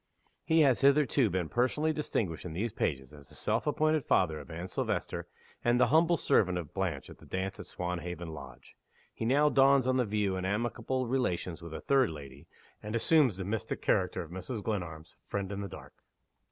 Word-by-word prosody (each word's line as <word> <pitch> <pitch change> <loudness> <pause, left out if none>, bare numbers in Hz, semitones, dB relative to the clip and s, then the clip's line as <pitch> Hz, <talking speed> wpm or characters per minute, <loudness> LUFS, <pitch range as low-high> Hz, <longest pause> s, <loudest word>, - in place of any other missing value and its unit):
He 160 0 +4
has 135 -5 +4
hitherto 140 -3 +4
been 90 -2 -1
personally 140 - +1
distinguished 105 - -2
in 90 - -6
these 105 +7 -2
pages 65 -1 -2
as 70 -3 -13
the - - -11
self 110 +6 -1
appointed 155 0 +2
father 80 -4 +2
of - - -11
Anne 85 +2 -5
Silvester - - -2 0.4
and 120 +1 +3
the 125 - +4
humble 165 +2 +5
servant 90 -10 +2
of 85 -4 -6
Blanche 90 -8 -2
at - - -13
the - - -15
dance 95 +1 -3
at - - -7
Swanhaven 90 -1 -4
Lodge. 70 -4 -11 0.4
He 115 - -4
now 145 +5 +4
dawns 135 -2 +5
on 130 0 +2
the 125 - +2
view 105 -2 0
in 90 - -3
amicable 120 +6 -1
relations 90 -9 -1
with 85 -1 -8
a - - -6
third 135 -3 +3
lady 70 -3 -10 0.3
and 105 +2 -4
assumes 130 - +4
the 95 - -4
mystic 105 +1 -3
character - - +1
of 80 - -13
Mrs. 95 +5 -5
Glenarm's 85 -7 -4
"Friend 100 -1 -3
in 100 0 -4
the 100 - -5
Dark." - - -11
100 Hz, 195 wpm, -31 LUFS, 85-130 Hz, 0.4 s, humble